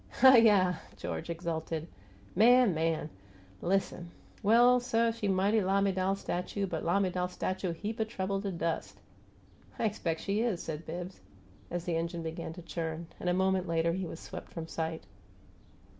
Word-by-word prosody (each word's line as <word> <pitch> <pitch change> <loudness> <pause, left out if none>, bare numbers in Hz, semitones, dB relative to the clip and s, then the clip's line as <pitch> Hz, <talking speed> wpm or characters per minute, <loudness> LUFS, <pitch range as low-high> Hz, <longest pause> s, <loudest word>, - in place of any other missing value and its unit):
"Hiyi!" 220 -8 +7 0.2
George 165 - -5
exulted. 165 -1 -3 0.5
"Man! 240 +1 +6
Man! 160 -1 -1 0.5
Listen! 180 -1 -1 0.3
Well, 240 +4 +6
suh, 230 -1 +1
she 225 -2 -3
mighty 195 +3 +3
lamiDAL 195 0 +1
statue, 195 +2 -2
but 165 -4 -4
lamiDAL 180 0 +1
statue 185 0 -2
heap 210 +7 -5
o' - - +3
trouble 195 -3 -2
to 200 -1 -3
dus'!" 165 -2 -3 0.8
"I - - 0
expect 180 -6 -1
she 205 +2 0
is!" 225 -7 -1
said 160 0 -6
Bibbs, 175 +3 -6 0.5
as 175 0 -4
the 170 -2 0
engine 170 0 -3
began 165 0 -5
to 175 0 -10
churn; 165 0 -4
and 180 - -1
a - - +3
moment 190 0 +1
later 165 0 +1
he 185 0 -3
was 165 - -7
swept - - -8
from 165 -1 -5
sight. 160 0 -3
185 Hz, 155 wpm, -31 LUFS, 165-200 Hz, 0.8 s, Hiyi